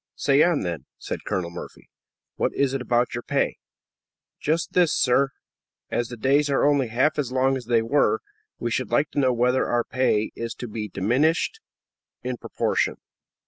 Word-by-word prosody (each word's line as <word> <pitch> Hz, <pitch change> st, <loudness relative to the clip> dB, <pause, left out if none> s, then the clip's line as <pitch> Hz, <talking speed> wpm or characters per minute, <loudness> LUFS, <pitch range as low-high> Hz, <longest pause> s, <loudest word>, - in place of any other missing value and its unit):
"Say 140 Hz, +1 st, +3 dB
on, 170 Hz, -4 st, +3 dB
then," 85 Hz, -6 st, -4 dB
said -, -, -6 dB
Colonel 85 Hz, -2 st, -2 dB
Murphy. 85 Hz, -, -10 dB, 0.5 s
"What -, -, -1 dB
is 140 Hz, -1 st, +1 dB
it 135 Hz, -, -2 dB
about 120 Hz, 0 st, +1 dB
your 120 Hz, -, -3 dB
pay?" -, -, 0 dB, 0.8 s
"Just 160 Hz, +2 st, -1 dB
this, 175 Hz, -4 st, +4 dB
sir; 135 Hz, +2 st, +3 dB, 0.6 s
as 120 Hz, -, 0 dB
the 120 Hz, -, -8 dB
days 140 Hz, +5 st, +2 dB
are 140 Hz, -, +2 dB
only 140 Hz, -3 st, +3 dB
half 130 Hz, +7 st, +1 dB
as 130 Hz, -4 st, -1 dB
long 130 Hz, +1 st, +2 dB
as 130 Hz, -2 st, -5 dB
they 115 Hz, -1 st, +2 dB
were, 145 Hz, -, +2 dB, 0.4 s
we 120 Hz, -, -3 dB
should 130 Hz, +2 st, -1 dB
like 145 Hz, +5 st, +1 dB
to -, -, -1 dB
know 130 Hz, -2 st, +3 dB
whether 125 Hz, +2 st, +2 dB
our 120 Hz, 0 st, +1 dB
pay 115 Hz, -5 st, +1 dB
is 115 Hz, 0 st, -4 dB
to 125 Hz, -, -6 dB
be 110 Hz, -1 st, -4 dB
diminished 135 Hz, -, +1 dB, 0.6 s
in -, -, -3 dB
proportion." -, -, -1 dB
130 Hz, 180 wpm, -24 LUFS, 115-140 Hz, 0.8 s, this